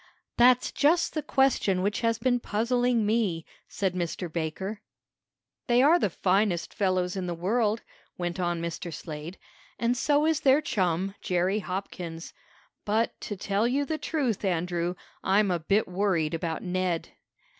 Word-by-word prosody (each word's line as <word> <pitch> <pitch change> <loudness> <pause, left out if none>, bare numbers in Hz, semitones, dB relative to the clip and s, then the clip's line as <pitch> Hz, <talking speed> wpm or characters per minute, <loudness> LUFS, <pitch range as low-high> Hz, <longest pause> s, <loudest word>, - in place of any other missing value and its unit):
"That's 250 +1 +5
just 320 +5 +2
the 310 - -1
question 265 -10 +2
which 205 +3 0
has 230 -1 +1
been 245 +1 +1
puzzling 235 +1 +1
me," 205 -7 0 0.2
said 190 -2 -1
Mr. 175 -1 -3
Baker. 190 +6 -3 0.9
"They 245 +1 +4
are 325 +5 +6
the 205 - +1
finest 185 0 +1
fellows 185 -3 0
in 185 -2 -3
the 175 - -2
world," 215 +5 0 0.3
went 175 +1 -3
on 175 -1 0
Mr. 170 +1 -4
Slade, 155 +3 -7 0.4
"and 235 +1 +1
so 290 +3 +2
is 320 -2 +2
their 275 -1 +5
chum, 190 - 0
Jerry 185 +3 +1
Hopkins. 180 -4 -6 0.5
But, 220 +2 +1
to 205 - -5
tell 200 +4 0
you 275 +4 +1
the 310 +2 -3
truth, 260 - -1
Andrew, 175 -1 -1 0.3
I'm 195 +1 +3
a 175 - 0
bit 195 +7 +1
worried 180 -4 0
about 165 -1 -3
Ned." 180 -2 -1
195 Hz, 150 wpm, -27 LUFS, 175-235 Hz, 0.9 s, are